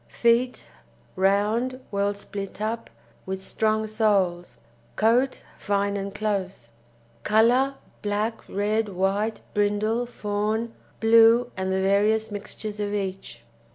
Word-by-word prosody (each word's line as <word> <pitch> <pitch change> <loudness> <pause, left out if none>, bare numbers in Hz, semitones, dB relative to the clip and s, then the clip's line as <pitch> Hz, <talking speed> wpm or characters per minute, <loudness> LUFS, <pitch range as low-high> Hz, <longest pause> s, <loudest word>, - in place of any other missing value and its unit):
FEET 235 +2 +1 0.5
Round, 210 +7 +1
well 200 0 0
split 200 -1 -7
up, 225 +2 -3 0.4
with 190 0 -4
strong 220 0 +1
soles. 195 - 0 0.4
COAT 240 +5 +2 0.2
Fine 200 0 0
and 200 0 -4
close. 195 - -3 0.5
COLOUR 245 +6 +3 0.3
Black, 210 +2 -1
red, 210 +2 0
white, 195 +4 -1
brindle, 210 +3 +1
fawn, 215 +1 -2 0.3
blue, 230 +2 +5
and 190 0 -2
the 190 0 +1
various 210 +3 +2
mixtures 210 +1 -6
of 205 0 -2
each. 190 - -5
210 Hz, 110 wpm, -25 LUFS, 200-225 Hz, 0.5 s, blue